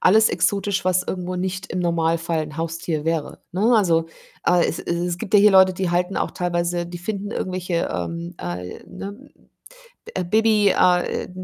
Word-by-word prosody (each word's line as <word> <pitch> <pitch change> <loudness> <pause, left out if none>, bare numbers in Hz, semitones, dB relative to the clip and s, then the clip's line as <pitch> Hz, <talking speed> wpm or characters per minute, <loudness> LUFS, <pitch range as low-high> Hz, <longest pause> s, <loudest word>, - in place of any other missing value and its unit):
alles 220 +4 +5
exotisch, 200 -1 0
was 185 0 +2
irgendwo 180 0 -4
nicht 185 +1 -3
im 185 - -2
Normalfall 165 -1 0
'n 150 0 -8
Haustier 165 -1 -3
wäre, 165 -2 -2
ne? 215 +7 +3
Also, 165 -6 +2 0.4
aber 175 -1 +3
es - - -3
es 170 - -2
es 175 0 -2
gibt 205 - -7
ja 205 - +8
hier 210 +1 +7
Leute, 190 -1 +6
die 185 -1 -1
halten 180 +2 0
auch - - -1
teilweise 175 -1 -1
die 175 0 -7
finden 200 +2 -4
irgendwelche, 180 -4 -2
ähm, 170 +1 -4
äh 90 +1 -6
ne? 195 - -7
Hm, 255 +8 -12 0.8
äh, 185 - -1
Baby 215 +1 +3
a 180 -1 +4
äh, - - -4
180 Hz, 185 wpm, -22 LUFS, 170-195 Hz, 0.8 s, ja